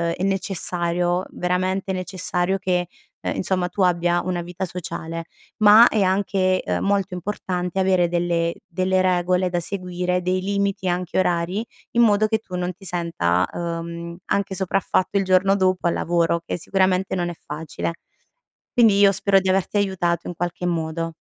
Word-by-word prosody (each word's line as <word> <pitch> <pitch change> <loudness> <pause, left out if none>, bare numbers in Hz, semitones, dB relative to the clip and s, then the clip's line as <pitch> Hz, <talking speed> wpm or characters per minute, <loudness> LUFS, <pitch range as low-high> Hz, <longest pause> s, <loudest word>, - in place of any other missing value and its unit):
è 180 - -4
necessario, 180 -2 0
veramente 185 +2 -1
necessario, 185 0 -1
che, 180 -2 0 0.3
uhm, - - -2
insomma 185 -1 -1
tu 195 - -3
abbia 175 -1 +2
una 180 -1 -2
vita 180 +2 -5
sociale, 165 -2 -6 0.3
ma 215 +2 +8
è 215 - +1
anche, 185 -1 +1
uhm, - - 0
molto 200 -2 0
importante 180 -1 -3
avere 185 -2 +3
delle 170 -1 0
delle 185 +1 +1
regole 180 0 +1
da 175 - -1
seguire, 180 -1 -2
dei 185 +1 0
limiti 200 -1 -1
anche 180 0 -2
orari, 180 +4 0 0.3
in 235 - +3
modo 215 -1 +4
che 220 0 0
tu 190 -4 -9
non 180 0 -2
ti 195 - -19
senta, 130 - 0
uhm, 170 0 -5
anche 200 -1 0
sopraffatto 190 +1 0
il 195 - +2
giorno 190 +1 +4
dopo 185 -2 +1
al - - +1
lavoro, 170 -1 +1
che - - -3
sicuramente 190 +1 +1
non 175 -1 -1
è 175 - -6
facile. 155 +2 -5 0.8
Quindi 225 -5 +5
io 200 -1 +7
spero 195 0 +3
di 190 0 -2
averti 190 +2 +1
aiutato 175 -4 0
in - - -4
qualche 175 +1 -3
modo. 165 -1 -2
180 Hz, 160 wpm, -22 LUFS, 175-190 Hz, 0.8 s, ma